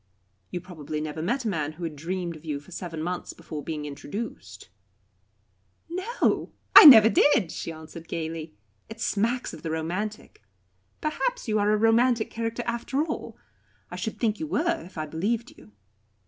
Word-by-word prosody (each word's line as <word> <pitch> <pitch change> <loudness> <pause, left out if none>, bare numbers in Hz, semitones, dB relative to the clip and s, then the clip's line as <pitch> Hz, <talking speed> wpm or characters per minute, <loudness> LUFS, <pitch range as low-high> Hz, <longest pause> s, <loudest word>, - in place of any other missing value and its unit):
"You 180 - -4
probably 155 -4 -6
never 155 +1 -4
met 240 +9 -1
a - - +1
man 155 -6 -2
who 170 +3 -9
had 160 -2 -4
dreamed 170 +2 -4
of 155 - -13
you 150 -3 -3
for 145 +6 -17
seven 165 -3 -5
months 180 +1 -4
before 150 -3 -8
being 155 -2 -4
introduced." 145 - -7 1.2
"No, 375 +8 -1 0.2
I - - +13
never 225 -7 +11
did," 215 - +4
she - - -5
answered 160 +1 -10
gaily. 160 -1 -5 0.3
"It 225 +1 -9
smacks 235 +2 0
of - - -9
the 165 - -4
romantic. 180 - -4 0.6
Perhaps - - -2
you 215 -1 +1
are 205 0 +2
a 215 - +3
romantic 230 +1 +3
character 230 +1 -3
after 235 +5 -1
all. 315 - -6 0.5
I - - -5
should - - -4
think 220 -1 0
you 315 - -3
were, 335 +2 0
if 180 - -14
I 155 - -2
believed 215 +10 -2
you. 105 0 -17
185 Hz, 170 wpm, -26 LUFS, 160-230 Hz, 1.2 s, I